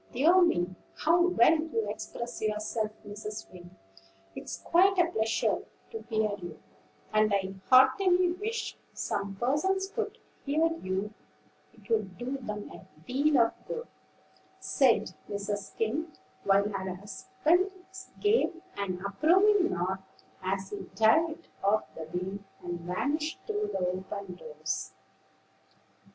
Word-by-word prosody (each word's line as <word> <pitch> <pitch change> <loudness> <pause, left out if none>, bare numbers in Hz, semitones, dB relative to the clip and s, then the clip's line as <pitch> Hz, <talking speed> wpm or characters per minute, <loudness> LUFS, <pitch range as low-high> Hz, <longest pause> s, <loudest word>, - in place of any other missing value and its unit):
"Dear 330 +9 +5
me! 185 - +2 0.2
how 335 +3 +4
well 325 -2 +5
you 295 -9 -1
express 235 +3 -5
yourself, 215 0 -1 0.2
Mrs. 210 +1 -7
Wing; 175 0 -13 0.6
it's - - -6
quite 385 +3 +4
a 355 - +6
pleasure 225 -5 +1 0.3
to 450 - -5
hear 215 -2 +1
you; 175 -3 -8 0.5
and 215 0 +4
I 195 -1 0 0.2
heartily 355 +7 +6
wish 440 +5 -3 0.2
some 200 -1 -3
persons 345 - +1
could - - -3 0.3
hear 300 +3 +2 0.2
you, 190 +3 -2 0.6
it 215 -4 -20
would 200 -5 0
do 255 +3 -3
'em 210 0 -5
a - - -12 0.2
deal 285 +5 +2
of 230 - +3
good," 475 0 -4 0.7
said - - +3 0.2
Mrs. 205 -1 -3
Skim; 290 +9 -1 0.3
while 200 +1 +4
her 190 -3 -3
husband 300 - +1 0.5
gave 415 -5 +2 0.2
an 190 -2 -3
approving 360 - +4
nod 185 +2 -1 0.4
as 190 +1 -2
he 195 -3 -6
dived 315 +9 +3 0.2
off 205 +2 +3
the 160 - -7
beam, 180 +4 -4 0.2
and 175 -1 -4
vanished 285 - -1
through 420 -1 -1
the 180 - -1
open 190 +1 -4
doors. 155 -2 -5
215 Hz, 125 wpm, -30 LUFS, 195-320 Hz, 0.7 s, a